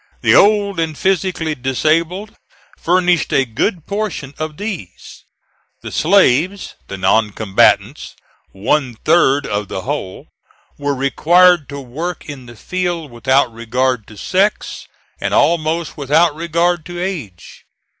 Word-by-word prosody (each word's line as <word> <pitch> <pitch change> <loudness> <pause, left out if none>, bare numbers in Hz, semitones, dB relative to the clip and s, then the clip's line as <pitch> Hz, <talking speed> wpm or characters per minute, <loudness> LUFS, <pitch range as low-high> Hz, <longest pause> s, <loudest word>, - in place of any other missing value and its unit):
The - - +3
old 200 -3 +4
and 160 -2 -2
physically 185 -4 0
disabled 160 - -1 0.4
furnished 175 -1 +1
a 135 - +2
good 155 - -2
portion 200 -9 -4
of 155 -1 -5
these. 185 - -8 0.6
The - - -7
slaves, 185 +1 +2
the 100 - -6
non 105 +3 +2
combatants, 100 -3 +1 0.4
one 125 +5 -1
third 145 +1 +2
of 105 0 -3
the 95 - -5
whole, 125 -8 -5 0.5
were 145 0 -1
required 170 +4 +3
to 140 0 -6
work 155 +7 -6
in 135 -4 -9
the 120 - -12
field 175 +2 -3
without 125 +1 +1
regard 120 +1 -1
to 105 - -14
sex, 195 - -1 0.3
and - - -1
almost 165 0 +1
without 150 +3 +2
regard 170 +1 0
to 175 0 -7
age. 155 - -6
155 Hz, 125 wpm, -17 LUFS, 130-175 Hz, 0.6 s, old